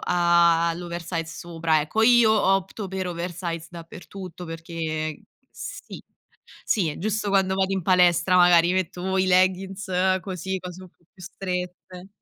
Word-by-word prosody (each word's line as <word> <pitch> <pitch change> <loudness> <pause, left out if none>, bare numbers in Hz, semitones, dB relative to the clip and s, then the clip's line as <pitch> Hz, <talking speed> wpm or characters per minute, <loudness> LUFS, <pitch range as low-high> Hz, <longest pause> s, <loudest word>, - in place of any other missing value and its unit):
all'oversize 170 -1 +1
sopra 165 -1 -1
ecco. 155 +9 -2
Io 235 -1 +6
opto 195 -1 0
per 190 0 -4
oversize 170 -1 -5
dappertutto 180 +1 -10
perché 165 +1 -9
ehm 155 -2 -3 0.3
sì - - -9 0.6
sì 190 -7 +1
è 150 - -7
giusto 210 +2 -2
quando 190 -1 +2
vado 190 0 0
in 190 - -1
palestra 180 0 +3
magari 175 -1 +5
metto 185 -1 -2
o 190 +1 -1
i 190 - +2
leggings 185 +2 +1 0.3
così, 190 0 -4
cose 180 0 -9
un 185 - -13
po' 170 - -37
più 185 - -17
strette. 180 0 -6
180 Hz, 140 wpm, -24 LUFS, 170-190 Hz, 0.6 s, Io